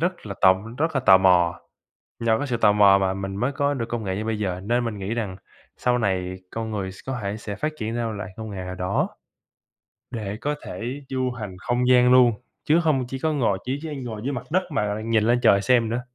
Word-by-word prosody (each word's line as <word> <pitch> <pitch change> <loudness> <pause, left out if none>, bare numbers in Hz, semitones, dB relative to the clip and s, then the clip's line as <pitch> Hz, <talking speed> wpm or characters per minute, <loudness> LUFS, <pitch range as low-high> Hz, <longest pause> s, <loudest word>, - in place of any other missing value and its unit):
rất 180 -5 -2
là 100 - -5
tò 95 0 +7 0.2
rất 160 +1 0
là 135 - +2
tò 95 -7 +7
mò. 90 -2 +3 0.6
Do 115 -1 +2
cái 145 - -3
sự 120 -2 -1
tò 105 - +5
mò 100 -1 +6
mà 95 0 +1
mình 95 0 -5
mới 125 +7 0
có 145 +1 0
được 115 -4 -2
công 120 -2 -3
nghệ 95 -2 -2
như 105 +2 -3
bây 110 -1 -2
giờ 95 -3 -2
nên 120 +3 0
mình 110 -3 -3
nghĩ 95 +4 -3
rằng 105 -6 -3 0.4
sau 125 0 +1
này 95 -4 -1 0.2
con 110 -1 -4
người 95 -3 -3
s 95 - -13
có 130 -1 -3
thể 100 +2 -3
sẽ 105 -1 -6
phát 155 0 -2
triển 115 -1 -3
ra 120 -1 -1
loại 105 -3 -4
công 110 -1 -6
nghệ 100 - -6
nào 90 0 -6
đó, 90 +2 0 1.0
để 105 -4 -4
có 145 +5 -2
thể 125 +5 -5
du 130 -1 0
hành 105 -6 -7
không 120 +6 0
gian 125 0 +6
luôn, 125 -2 +6 0.3
chứ 155 +3 +4
hông 150 -7 +1
chỉ 135 - -5
có 155 +3 0
ngồi 115 -9 +1
chỉ 130 +3 -2
chỉ 155 -3 -5
ngồi 115 -5 -6
dưới 140 - -1
mặt 125 - -5
đất 185 +4 +2
mà 105 -6 -1
nhìn 110 -1 +1
lên 120 +2 +3
trời 100 - +5
xem 120 -1 +3
nữa. 120 +2 -1
115 Hz, 250 wpm, -24 LUFS, 100-125 Hz, 1.0 s, tò